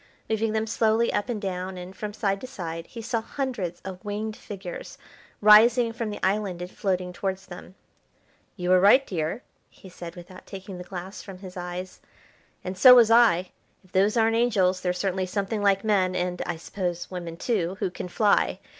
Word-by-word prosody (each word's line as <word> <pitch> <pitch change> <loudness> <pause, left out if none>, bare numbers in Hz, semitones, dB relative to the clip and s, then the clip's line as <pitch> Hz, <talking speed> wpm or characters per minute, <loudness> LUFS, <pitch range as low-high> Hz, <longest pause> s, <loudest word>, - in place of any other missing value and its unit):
Moving 220 0 0
them 220 0 0
slowly 225 +1 +1
up 205 - -1
and 230 -3 -2
down, 185 -1 -4
and 180 +1 -9
from 210 +1 -5
side 200 -2 -1
to 255 - -6
side, 165 -8 -6
he 230 -2 -9
saw 230 0 -1
hundreds 220 -9 -4
of 190 0 -8
winged 210 +1 -4
figures 195 -5 -8 0.4
rising 225 +3 +6
from 230 -2 -3
the 205 - -6
island 195 -2 0
and 180 +1 -6
floating 185 -2 -2
towards 190 +1 -3
them. 180 +1 -11 0.8
"You 180 -1 -1
were 185 - +6
right, 230 +9 +6
dear," 170 +6 -3 0.3
he 190 - -15
said, 175 -1 -9
without 180 +1 -12
taking 190 -1 -8
the - - -6
glass 185 +1 -7
from 195 -2 -10
his 185 -1 -10
eyes, 180 +1 -6 0.6
"and 185 +1 -4
so 250 +7 +9
was 230 -2 +6
I. 210 -7 +5 0.3
If 185 - -24
those 200 +4 +2
aren't 225 0 +3
angels, 195 -6 +2
they're 180 - 0
certainly 185 0 -1
something 200 +3 -2
like 200 -1 +3
men, 190 -4 +2
and, 180 0 -2
I 175 - -2
suppose, 175 +1 -4
women 170 -2 -6
too 190 -4 -1
who 180 - -1
can 180 - -6
fly. 205 +3 +2
190 Hz, 190 wpm, -26 LUFS, 180-220 Hz, 0.8 s, so